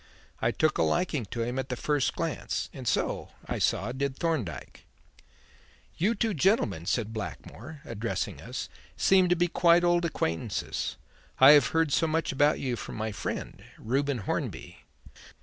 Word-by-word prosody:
I 115 Hz, -, +2 dB
took 155 Hz, +7 st, +1 dB
a -, -, +4 dB
liking 160 Hz, -9 st, +1 dB
to 115 Hz, +3 st, -3 dB
him 120 Hz, +3 st, -2 dB
at 130 Hz, -, -4 dB
the 125 Hz, -, -1 dB
first 145 Hz, +2 st, 0 dB
glance, 165 Hz, -2 st, -3 dB
and 130 Hz, -3 st, -7 dB
so, 115 Hz, -, -1 dB
I -, -, -3 dB
saw, 105 Hz, +6 st, +1 dB
did 135 Hz, +1 st, -2 dB
Thorndyke. 130 Hz, -, -3 dB, 1.1 s
"You 210 Hz, +8 st, +1 dB
two 220 Hz, 0 st, 0 dB
gentlemen," 130 Hz, -, +1 dB
said 110 Hz, -2 st, -1 dB
Blackmore, 120 Hz, +6 st, -7 dB
addressing 115 Hz, 0 st, -3 dB
us, -, -, -5 dB, 0.3 s
"seem 185 Hz, -2 st, +4 dB
to 180 Hz, -, +4 dB
be 175 Hz, 0 st, +2 dB
quite 170 Hz, 0 st, +4 dB
old 175 Hz, 0 st, +3 dB
acquaintances. 110 Hz, -, -2 dB, 0.4 s
I 135 Hz, +2 st, +9 dB
have 150 Hz, -1 st, +7 dB
heard 160 Hz, -3 st, +1 dB
so 165 Hz, -, +3 dB
much 160 Hz, +1 st, 0 dB
about 145 Hz, +2 st, +3 dB
you 130 Hz, -3 st, -1 dB
from -, -, -7 dB
my 110 Hz, 0 st, -3 dB
friend, 95 Hz, -, -5 dB
Reuben 135 Hz, +3 st, 0 dB
Hornby." -, -, -4 dB
140 Hz, 160 wpm, -28 LUFS, 115-165 Hz, 1.1 s, I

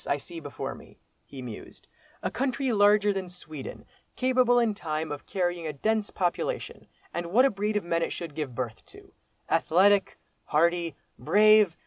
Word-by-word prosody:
I 140 Hz, -, +1 dB
see 165 Hz, +4 st, -8 dB
before 145 Hz, -3 st, -5 dB
me," -, -, -15 dB, 0.3 s
he 135 Hz, -2 st, -10 dB
mused, 115 Hz, -4 st, -10 dB, 0.4 s
"a -, -, -1 dB
country 265 Hz, 0 st, -1 dB
larger 205 Hz, -1 st, +4 dB
than 190 Hz, -2 st, -4 dB
Sweden, 155 Hz, -5 st, -8 dB, 0.3 s
capable 255 Hz, -1 st, +3 dB
in 230 Hz, -3 st, +3 dB
time 155 Hz, -5 st, -3 dB
of 145 Hz, -, -7 dB
carrying 175 Hz, -3 st, -1 dB
a 155 Hz, -, -3 dB
dense 215 Hz, +8 st, 0 dB
population; 185 Hz, -, -2 dB, 0.3 s
and 170 Hz, 0 st, -3 dB
what 235 Hz, +10 st, +5 dB
a 275 Hz, -, +3 dB
breed 210 Hz, +1 st, -1 dB
of 210 Hz, -, -2 dB
men 170 Hz, -1 st, 0 dB
it -, -, -1 dB
should 165 Hz, -4 st, -6 dB
give 145 Hz, -5 st, -4 dB
birth 115 Hz, -3 st, -4 dB
to, -, -, -17 dB, 0.3 s
athletic, 195 Hz, +4 st, +3 dB, 0.3 s
hardy, 170 Hz, 0 st, +1 dB, 0.2 s
brave! 210 Hz, +1 st, +5 dB
180 Hz, 165 wpm, -27 LUFS, 155-215 Hz, 0.4 s, what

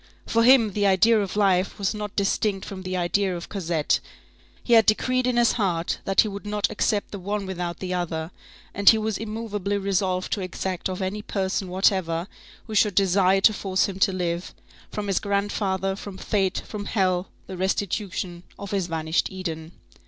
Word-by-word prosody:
For 230 Hz, 0 st, +2 dB
him, 235 Hz, -4 st, +6 dB
the 205 Hz, 0 st, +2 dB
idea 215 Hz, +3 st, +4 dB
of 200 Hz, -1 st, -4 dB
life 195 Hz, -2 st, +2 dB
was 200 Hz, 0 st, 0 dB
not 210 Hz, -1 st, -6 dB
distinct 200 Hz, 0 st, 0 dB
from 190 Hz, -1 st, -7 dB
the 185 Hz, 0 st, -3 dB
idea 180 Hz, +1 st, 0 dB
of 170 Hz, -, -9 dB
Cosette. 170 Hz, -6 st, 0 dB, 0.6 s
He 240 Hz, -, +1 dB
had 225 Hz, -2 st, +6 dB
decreed 255 Hz, +4 st, +2 dB
in 250 Hz, -1 st, +1 dB
his 240 Hz, -1 st, +5 dB
heart 175 Hz, -6 st, -1 dB
that 195 Hz, 0 st, +5 dB
he -, -, -1 dB
would 200 Hz, 0 st, -7 dB
not 210 Hz, 0 st, 0 dB
accept 210 Hz, -1 st, 0 dB
the 200 Hz, -, -6 dB
one 200 Hz, +2 st, -3 dB
without 175 Hz, -2 st, -4 dB
the 185 Hz, -1 st, -4 dB
other, 165 Hz, -2 st, -3 dB, 0.4 s
and 200 Hz, +1 st, +6 dB
he 220 Hz, -, +6 dB
was 220 Hz, -1 st, -2 dB
immovably 210 Hz, -2 st, -3 dB
resolved 190 Hz, -2 st, 0 dB
to 205 Hz, -, -2 dB
exact 185 Hz, 0 st, -3 dB
of 185 Hz, +1 st, -3 dB
any 200 Hz, +3 st, -3 dB
person 190 Hz, -1 st, -2 dB
whatever, 180 Hz, -2 st, +1 dB, 0.4 s
who 220 Hz, -, -8 dB
should 210 Hz, -2 st, +3 dB
desire 195 Hz, 0 st, +3 dB
to 215 Hz, -, +6 dB
force 190 Hz, -2 st, 0 dB
him 195 Hz, -1 st, -5 dB
to 195 Hz, -, +4 dB
live,—from 180 Hz, +3 st, -5 dB
his 195 Hz, -2 st, +1 dB
grandfather, 200 Hz, -1 st, -1 dB
from 200 Hz, -1 st, -8 dB
fate, 195 Hz, -2 st, -1 dB
from 205 Hz, -2 st, -6 dB
hell,—the 185 Hz, -2 st, -2 dB
restitution 190 Hz, -2 st, -2 dB, 0.2 s
of 200 Hz, +1 st, -7 dB
his 195 Hz, -3 st, 0 dB
vanished 160 Hz, -1 st, 0 dB
Eden. 165 Hz, -4 st, -6 dB
195 Hz, 180 wpm, -24 LUFS, 185-210 Hz, 0.6 s, him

